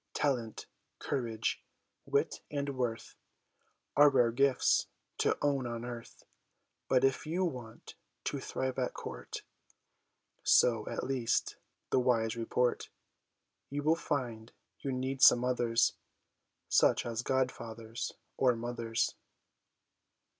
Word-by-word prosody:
ALSO - - -4
Talent, 125 -7 -1 0.3
courage, 115 -5 -2 0.4
wit, - - 0
and 140 -1 -3
worth 120 -3 -3 0.8
Are 145 0 +8
rare 125 -4 +3
gifts 135 +2 +3 0.3
to - - +2
own 140 -3 +1
on 120 0 -4
earth. 120 -1 -8 0.6
But 130 0 +3
if 135 +2 +1
you 180 +4 +1
want 125 -9 -7 0.3
to - - -2
thrive 130 0 -3
at 125 - -1
court - - -7 1.0
So, 115 -3 +4
at - - -3
least, 130 -3 0 0.3
the 130 - +4
wise 115 -2 +2
report 120 +1 0 0.8
You 145 +1 -3
will 155 +2 +4
find 120 -9 -3 0.3
you 135 - -3
need 130 +1 -2
some 125 -1 +8
others, 120 -2 +2 0.7
Such - - +4
as 115 -1 -2
god 130 0 +1
fathers 115 0 -6 0.3
or 125 -2 +4
mothers. 115 -1 -1
125 Hz, 120 wpm, -32 LUFS, 115-135 Hz, 1.0 s, Are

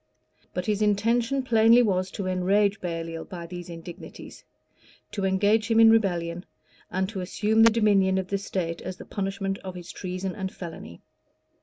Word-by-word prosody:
[*] - - -38
But 180 - -2
his 210 -1 0
intention 230 +6 +1
plainly 230 0 +5
was 185 -3 0
to 200 - -4
enrage 195 +3 +1
Baliol 165 -2 -4
by 175 -3 -8
these 175 0 -8
indignities, 170 +1 -10 0.7
to 200 -2 -2
engage 205 +4 +2
him 225 0 +4
in 225 0 +8
rebellion, 175 -5 +1 0.5
and 190 +1 -1
to 200 -3 -5
assume 215 +4 +1
the 230 - +8
dominion 200 -4 +3
of 190 -1 -3
the 200 - -1
state 175 -4 -3
as 185 0 -6
the - - -10
punishment 195 0 -3
of 185 -1 -8
his 175 -1 -8
treason 185 0 -4
and 190 -1 -4
felony. 160 - -9
190 Hz, 170 wpm, -26 LUFS, 180-215 Hz, 0.7 s, in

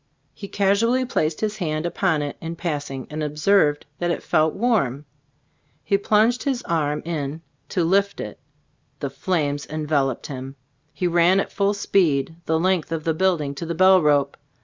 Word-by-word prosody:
He 200 - -8
casually 215 +7 +2
placed 155 -10 -1
his 215 -1 -1
hand 155 -4 -2
upon 160 -2 0
it 145 - -4
in 165 +1 -5
passing, 145 -6 -4
and 155 +1 -4
ob 150 0 -4
serving 155 -4 +3 0.2
that 175 - 0
it 170 - -2
felt 155 0 +2
warm, 195 - 0 0.8
he 200 - +1
plunged 215 +4 +2
his 265 -3 -1
arm 150 -3 -1
in 155 -1 -4 0.3
to 180 - 0
lift 200 +4 +1
it. - - -6 0.6
The - - -4
flames 145 -6 -1
en 155 0 -4
veloped 140 -4 0
him. 135 -1 -7 0.4
He 180 - -3
ran 175 +2 +4
at - - -2
full 200 +1 +1
speed 165 -7 +1
the 160 0 +2
length 180 -2 0
of 160 -1 -2
the 160 - +1
building 160 -5 0
to 140 +4 -6
the 170 - -3
bell 185 +1 +6
rope. 145 -2 +2
165 Hz, 175 wpm, -23 LUFS, 150-195 Hz, 0.8 s, bell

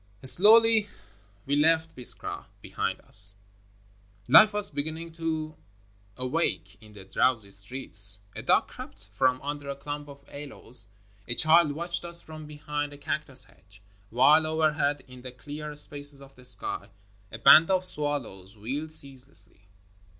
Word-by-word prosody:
Slowly 215 - +5 0.6
we 140 - -1
left 160 +2 +1
Biskra 125 - -1
behind - - -5
us. 100 -1 +3 0.9
Life 210 - +7
was 205 -1 +1
beginning 160 +3 -5
to 160 -1 -5 0.6
awake 125 - -3
in 110 -1 -17
the 100 -2 -13
drowsy 105 0 0
streets, 100 -1 +4
— 100 - -33
a - - -7
dog - - +1
crept 100 +1 -12
from 130 +3 0
under 145 0 -6
a 140 - -5
clump 145 +1 -8
of 140 0 -16
aloes, 130 -5 -3 0.4
a 120 - -2
child 155 0 +3
watched 170 +3 -5
us 170 0 +5
from 155 -2 -11
behind 145 -1 -6
a - - -12
cactus 140 -2 -3
hedge, 100 +2 -23
— 100 0 -34
while 145 +7 +3
overhead 155 -2 -1
in 125 -1 -14
the 130 0 -10
clear 150 +4 -9
spaces 145 -1 -2
of 140 0 -16
the 125 -1 -18
sky 115 -4 -3 0.4
a 110 - -8
band 155 +8 +6
of 185 -1 0
swallows 130 - -4
wheeled 140 +9 -6
ceaselessly. 130 -8 +1
145 Hz, 150 wpm, -26 LUFS, 125-155 Hz, 0.9 s, Life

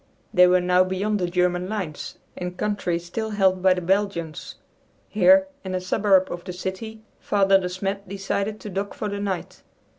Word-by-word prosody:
They 180 0 +7
wore 180 0 +4
now 180 +1 +4
beyond 195 +3 -1
the 180 - 0
German 180 +1 0
lines 185 -9 -5 0.2
in 180 0 -5
country 205 -4 -1
still 175 +6 -5
held 190 -3 +2
by 185 0 +4
the 180 - -3
Belgians. 180 -3 -2 0.5
Here, 285 +1 +5 0.2
in 185 -1 -4
a - - 0
suburb 190 0 +2
of 175 0 -6
the 180 - -6
city, 215 +5 -6 0.2
Father 195 -1 +3
De 180 -1 -3
Smet 195 +1 -4
decided 200 +2 -3
to 210 - -7
dock 195 +2 -4
for 215 - -3
the 200 0 -4
night. 195 -3 -4
190 Hz, 180 wpm, -24 LUFS, 180-205 Hz, 0.5 s, They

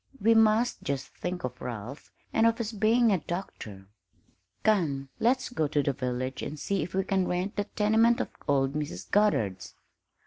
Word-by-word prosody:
"We 225 +2 +4
must 225 +2 +3
just 140 -1 -3
think 180 0 -5
of 125 0 -5
Ralph 120 +3 -7 0.2
and 225 - +4
of 230 0 +2
his 230 -2 -3
being 225 +2 +3
a 190 - +2
doctor. 130 - -6 0.8
Come, 150 -11 +1
let's 255 +3 +2
go 160 -12 0
to 145 0 +1
the 140 - 0
village 130 0 -3
and 150 - -5
see 200 +4 -1
if 170 +4 -5
we 190 - +2
can 190 -1 0
rent 180 +3 -2
that 205 - -3
tenement 225 +3 +4
of - - -2 0.2
old 135 -1 +2
Mrs. 145 -12 -5
Goddard's." 110 - +1
180 Hz, 175 wpm, -28 LUFS, 135-215 Hz, 0.8 s, We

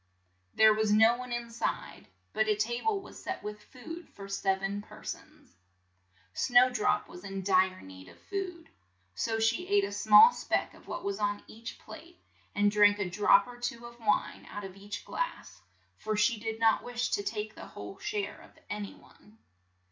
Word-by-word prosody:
There 220 0 +7
was 215 0 +1
no 220 +3 +6
one 250 0 -7
in 240 -1 -4
side, 230 - -4 0.3
but 215 0 +1
a 215 - +3
ta 235 +3 -2
ble 420 -3 +1
was 375 - -12
set - - -5
with 210 0 -6
food 325 +9 -10
for 195 -1 -10
sev 195 -1 0
en 200 +1 -2
per - - -14
sons. - - -9 0.8
Snow 250 0 +5
drop 210 -3 +1
was 180 - -12
in 195 -1 -5
dire 185 -1 +3
need 95 0 -12
of 85 - -15
food, 365 -4 -5 0.4
so 225 - -1
she 225 +10 +1
ate 405 0 +3
a 395 - -2
small 460 +2 +8
speck - - -1
of - - -18
what - - -5
was 200 +1 -2
on 205 0 -1
each 230 +1 -9
plate, 345 +1 -13 0.4
and 205 0 +3
drank 205 0 +5
a 205 -3 -1
drop 210 - +4
or 245 0 -11
two 240 -1 -4
of 235 0 -12
wine 210 -2 0
out 205 - -7
of 190 -1 -8
each 200 +1 -8
glass, - - -4 0.4
for 215 -1 -2
she 215 +1 +2
did 225 +1 -4
not 225 -1 +3
wish 245 0 -2
to - - +1
take 210 +1 -4
the - - -10
whole 100 -1 -9
share 205 -1 -3
of - - -18
an 205 0 -3
y - - -12
one. 210 +1 -21
215 Hz, 195 wpm, -30 LUFS, 205-245 Hz, 0.8 s, small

